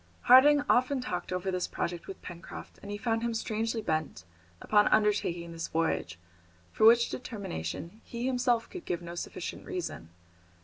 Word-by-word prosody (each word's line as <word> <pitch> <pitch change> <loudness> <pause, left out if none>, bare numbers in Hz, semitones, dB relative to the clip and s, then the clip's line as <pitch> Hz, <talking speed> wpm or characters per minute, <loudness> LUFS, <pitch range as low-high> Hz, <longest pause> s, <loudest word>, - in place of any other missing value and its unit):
Harding 285 +4 +7
often 255 +2 +3
talked 180 -9 -4
over 180 +1 -1
this 180 -1 -1
project 170 -1 -4
with 195 - -9
Pencroft, 175 0 -9
and 200 - -9
he 205 - -3
found 225 +1 0
him 235 -1 -1
strangely 225 0 -2
bent 155 - -2 0.3
upon 210 -1 +4
undertaking 200 -5 +1
this 165 0 -4
voyage, 160 - -1 0.5
for 220 - +5
which 235 +1 +6
determination 200 - -5
he 235 +1 -5
himself 245 -2 +1
could 365 -2 -9
give 175 0 -3
no 170 0 -7
sufficient 175 - -6
reason. 360 - -5
210 Hz, 160 wpm, -30 LUFS, 170-240 Hz, 0.5 s, Harding